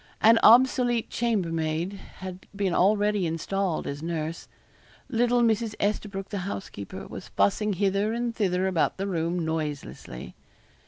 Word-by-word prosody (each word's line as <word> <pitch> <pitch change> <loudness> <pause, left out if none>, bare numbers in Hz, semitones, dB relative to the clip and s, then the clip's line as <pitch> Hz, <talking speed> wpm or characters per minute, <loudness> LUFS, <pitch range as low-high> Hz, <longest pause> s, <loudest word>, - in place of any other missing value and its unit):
An 225 +1 +6
obsolete 240 0 +5
chambermaid 170 -6 -1 0.2
had 185 0 -8
been 195 -3 0
already 205 0 +3
installed 170 +2 -1
as 140 +1 -5
nurse. 165 0 -4 0.6
Little 245 0 +2
Mrs. 225 -1 +1
Esterbroke, 200 -1 -2
the 205 - -3
housekeeper, 180 - -6
was - - -8
fussing 150 - +1
hither 200 +2 +1
and 235 0 -2
thither 185 -3 +1
about 185 -4 +1
the 195 - -2
room 170 -2 -1
noiselessly. 150 - -5
195 Hz, 125 wpm, -27 LUFS, 165-215 Hz, 0.6 s, An